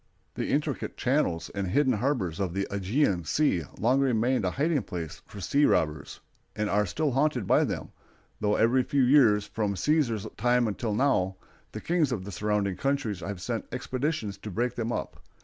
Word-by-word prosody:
The - - -3
intricate - - -1
channels 85 0 0
and 100 -1 -2
hidden 130 +7 +2
harbors 105 - -1
of 95 -3 -2
the 100 0 0
Ægean 100 - 0
Sea 90 - +1
long 125 +5 +2
remained 125 -3 +1
a - - +2
hiding 145 - 0
place 85 -5 -6
of 100 -3 -8
sea 140 - +2
robbers, 75 - 0 0.3
and 105 -1 -1
are 105 0 +2
still 150 - -1
haunted 135 -4 +1
by - - +4
them, - - -4 0.5
though 105 0 +1
every 120 +4 +3
few 135 +2 +1
years, 120 -6 +5
from 105 -3 -2
Cæsar's 115 - +1
time 120 -3 +2
till 110 -1 -2
now, 95 -8 +2 0.4
the - - -7
kings 165 -5 +1
of 105 -7 -2
the 100 - -6
surrounding 100 0 -1
countries 135 -8 -1
have 95 +2 -5
sent 115 -2 -3
expeditions 125 -5 -3
to 105 - -7
break 120 +5 -1
them 115 0 -3
up. - - -4
110 Hz, 180 wpm, -28 LUFS, 100-135 Hz, 0.5 s, years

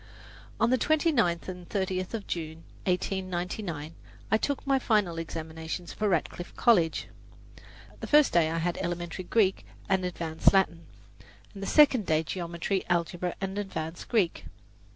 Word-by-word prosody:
On 230 +2 +3
the 255 - +3
29th 280 - +2
and 180 -1 -7
30th 190 0 -2
of 215 - -5
June, 160 -1 -5 0.2
1899, 180 -3 -2 0.4
I 220 - +5
took 285 +3 -2
my 275 -1 +3
final 205 -9 +1
examinations 160 +1 -5
for 210 -1 0
Radcliffe 175 0 -2
College. 180 -9 +3 0.9
The - - -6
first 300 -1 +5
day 165 -2 +4
I 165 - -2
had 170 +1 -1
Elementary 175 0 -4
Greek 195 -1 +2 0.2
and 190 -1 +2
Advanced 165 -2 +1
Latin, 185 -4 +1 0.7
and 200 - -9
the 195 - -3
second 275 -9 +5
day 155 0 +2
Geometry, 170 +4 -2
Algebra 175 +1 0
and 195 +1 -3
Advanced 170 -4 -5
Greek. 200 -8 +1
180 Hz, 140 wpm, -28 LUFS, 170-205 Hz, 0.9 s, I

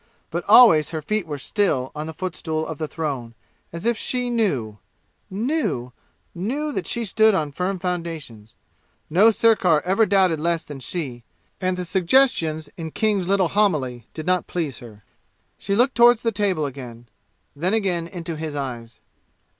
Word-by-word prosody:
But - - -2
always 160 - +7
her 160 -2 -4
feet 215 +1 -1
were 145 -2 -4
still 140 -5 0
on 150 +1 -5
the 160 - -6
footstool 160 -4 -3
of 160 -2 -6
the 155 - -2
throne, 135 -8 -4 0.4
as 170 +3 -7
if 235 0 +2
she 250 +2 -2
knew 135 - -1 0.5
knew 200 - -2 0.4
knew 270 - -3
that 190 -10 -4
she 235 -1 -1
stood 220 +1 +4
on 150 -5 -1
firm 185 +6 -2
foundations. 165 - -5 0.6
No 195 +8 +6
sirkar 210 -8 +3
ever 195 +4 +3
doubted 185 -5 +3
less 170 +1 0
than 145 -2 -9
she, 130 -3 -5 0.4
and 185 0 0
the 180 - -3
suggestions 170 - +2
in 165 -2 -5
King's 205 0 0
little 190 -3 +2
homily 140 - 0
did 155 - -6
not 180 0 +1
please 160 -7 -3
her. 110 -4 -13 0.6
She 200 - -1
looked 245 +4 +3
toward 240 0 +6
the 230 0 -1
table 195 -7 0
again 125 -4 -8 0.5
then 180 +8 0
again 180 -6 0
into 170 -2 -6
his 155 -1 -5
eyes. 120 -5 -6
170 Hz, 160 wpm, -22 LUFS, 150-205 Hz, 0.6 s, always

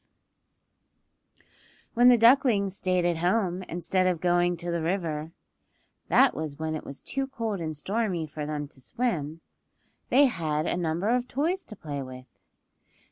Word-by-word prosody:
V - - -30 0.5
WHEN 245 +2 +6
the 245 - +7
ducklings 230 -5 +4
stayed 185 -2 0
at 175 -1 +1
home 180 +1 0
instead 185 +2 0
of 180 -3 0
going 175 0 +2
to 175 +1 -4
the 170 -1 -1
river 160 -3 -2 0.8
(that - - +5
was 150 -1 -5
when 160 0 -3
it 155 - -4
was 140 - -9
too 270 0 -2
cold 225 -6 -3
and 155 -2 -4
stormy 195 -1 -1
for 150 0 -6
them 150 -1 -3
to 130 - -16
swim) 165 - -2 0.7
they 280 +3 +6
had 155 - -1
a - - 0
number 175 +3 -1
of 245 +1 +1
toys 330 +10 -1
to 215 - -10
play 145 -6 -5
with. 130 -1 -9
175 Hz, 160 wpm, -27 LUFS, 155-225 Hz, 0.8 s, the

